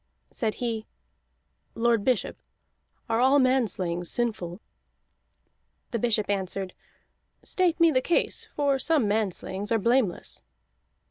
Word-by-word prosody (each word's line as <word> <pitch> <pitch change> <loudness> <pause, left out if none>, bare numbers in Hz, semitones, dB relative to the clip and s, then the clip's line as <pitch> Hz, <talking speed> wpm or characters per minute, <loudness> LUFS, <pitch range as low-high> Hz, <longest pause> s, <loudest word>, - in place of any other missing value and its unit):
Said 220 -4 -1
he: 225 -3 -3 0.9
"Lord 230 -2 +2
Bishop, 250 -3 0 0.7
are 225 -1 +1
all 265 +3 +5
manslayings 195 -10 +1
sinful?" 210 -7 -2 1.3
The 235 - -1
bishop 220 -2 +1
answered: 195 -1 -2 0.7
"State 360 -2 +1
me 335 -1 +6
the 255 -3 +2
case, 340 - 0
for 280 -2 +2
some 295 -5 +2
manslayings 205 -1 -2
are 225 - +4
blameless." 230 -3 0
230 Hz, 110 wpm, -27 LUFS, 200-260 Hz, 1.3 s, me